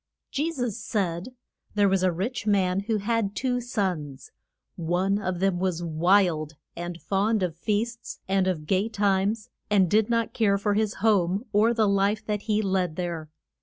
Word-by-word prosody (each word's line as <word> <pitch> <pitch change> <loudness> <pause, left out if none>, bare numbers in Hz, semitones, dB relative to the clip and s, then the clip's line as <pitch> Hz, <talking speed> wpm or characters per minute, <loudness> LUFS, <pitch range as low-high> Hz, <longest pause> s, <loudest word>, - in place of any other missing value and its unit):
JE 310 +4 0
SUS 245 -7 -3
said, 195 +2 -2 0.4
There 205 -1 +4
was 190 -1 +2
a 185 -1 +3
rich 215 +7 -3
man 190 -2 +2
who 215 +2 -1
had 210 -1 -1
two 250 -1 0
sons. 180 - -3 0.4
One 180 +4 0
of 185 -2 -2
them 190 -2 +1
was 180 -2 -1
wild, 165 -1 +2 0.2
and 175 0 -5
fond 205 +2 +1
of 170 -3 -2
feasts 225 +6 -2
and 190 0 +2
of 165 -5 -1
gay 195 +6 +1
times, 205 +2 0 0.2
and 200 -3 +4
did 215 +1 +3
not 230 -1 0
care 205 -4 +2
for 205 +1 0
his 215 0 0
home, 195 0 +2
or 215 +3 +4
the 225 -2 +2
life 200 +2 +1
that 210 -1 -2
he 215 0 +2
led 185 -4 0
there. 170 -3 -4
200 Hz, 170 wpm, -26 LUFS, 180-215 Hz, 0.4 s, There